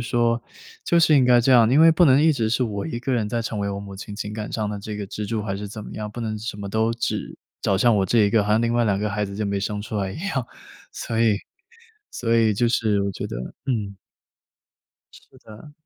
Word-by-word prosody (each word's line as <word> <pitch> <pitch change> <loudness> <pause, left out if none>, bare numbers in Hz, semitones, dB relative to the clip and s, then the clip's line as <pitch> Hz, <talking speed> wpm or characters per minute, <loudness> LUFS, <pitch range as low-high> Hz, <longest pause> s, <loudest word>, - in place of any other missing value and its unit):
说， 120 0 +1 0.4
就 170 - +3
是 155 -3 +5
应 130 - +5
该 125 -1 +5
这 125 - +1
样， 120 -3 +6
因 140 +6 +4
为 165 0 +8
不 170 +2 +4
能 140 -1 +5
一 160 -1 +5
直 115 -5 -1
是 120 +3 +1
我 105 -4 -3
一 120 -7 -4
个 130 +2 -2
人 115 -4 0
在 115 +2 -2
成 110 -1 -4
为 100 0 -1
我 100 0 -4
母 100 -1 -9
亲 100 +1 -8
情 105 0 -5
感 105 0 -5
上 105 -2 -2
的 105 - -4
这 105 +1 -6
个 105 - -4
支 105 +2 -6
柱 110 0 -2
还 100 -2 -3
是 105 +1 -6
怎 105 +1 -8
么 - - -9
样， 105 0 -5
不 115 +3 -8
能 110 -2 -3
什 110 0 -5
么 100 -1 -6
都 110 +3 +1
只 115 - -3 0.2
找 95 - +1
向 115 +1 +4
我 95 - +1
这 115 - +2
一 105 -2 +4
个， 105 -1 +3
好 105 - -2
像 110 +2 +3
另 115 0 +1
外 120 0 +2
两 100 -3 +1
个 105 +1 -2
孩 105 0 -1
子 100 0 -7
就 105 +1 -2
没 100 0 -1
生 105 +1 -3
出 110 - -5
来 95 -2 -2
一 - - -8
样。 130 -9 -2 0.5
所 115 - -4
以 110 -3 +3 0.8
所 115 -1 0
以 110 -2 +3
就 120 +4 +2
是 110 -4 +1
我 100 - -1
觉 - - -5
得 - - -6 0.3
嗯。 105 -7 -2 1.2
是 - - -18
的。 110 +7 -14
110 Hz, 290 characters per minute, -23 LUFS, 105-120 Hz, 1.2 s, 为